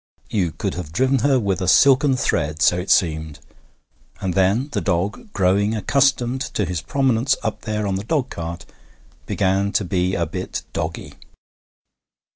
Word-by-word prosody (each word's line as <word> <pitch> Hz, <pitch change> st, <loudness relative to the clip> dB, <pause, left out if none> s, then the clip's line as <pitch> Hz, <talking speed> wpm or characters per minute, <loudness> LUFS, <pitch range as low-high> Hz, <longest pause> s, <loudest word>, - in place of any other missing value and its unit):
You 90 Hz, -6 st, 0 dB
could -, -, -3 dB
have 85 Hz, -4 st, -6 dB
driven 130 Hz, +9 st, +2 dB
her 135 Hz, +2 st, +3 dB
with 100 Hz, -5 st, -1 dB
a 90 Hz, -, -1 dB
silken 135 Hz, -, +5 dB
thread, 75 Hz, -, 0 dB
so 90 Hz, -, +4 dB
it 90 Hz, +1 st, -6 dB
seemed. 80 Hz, -5 st, +1 dB, 0.8 s
And 95 Hz, -2 st, -2 dB
then 100 Hz, -, +2 dB
the -, -, -1 dB
dog, 100 Hz, -, -2 dB
growing 100 Hz, +3 st, +1 dB
accustomed 130 Hz, +2 st, +1 dB
to 105 Hz, -, +1 dB
his 90 Hz, -2 st, -3 dB
prominence 130 Hz, 0 st, +1 dB
up 110 Hz, -, -3 dB
there 105 Hz, -1 st, -2 dB
on 95 Hz, -1 st, -1 dB
the 100 Hz, -, -5 dB
dogcart, 90 Hz, -, -3 dB, 0.6 s
began 100 Hz, +1 st, +1 dB
to 105 Hz, -, +1 dB
be 90 Hz, +1 st, 0 dB
a 85 Hz, -, 0 dB
bit 90 Hz, +4 st, -5 dB
doggy. -, -, -4 dB
100 Hz, 155 wpm, -21 LUFS, 90-125 Hz, 0.8 s, silken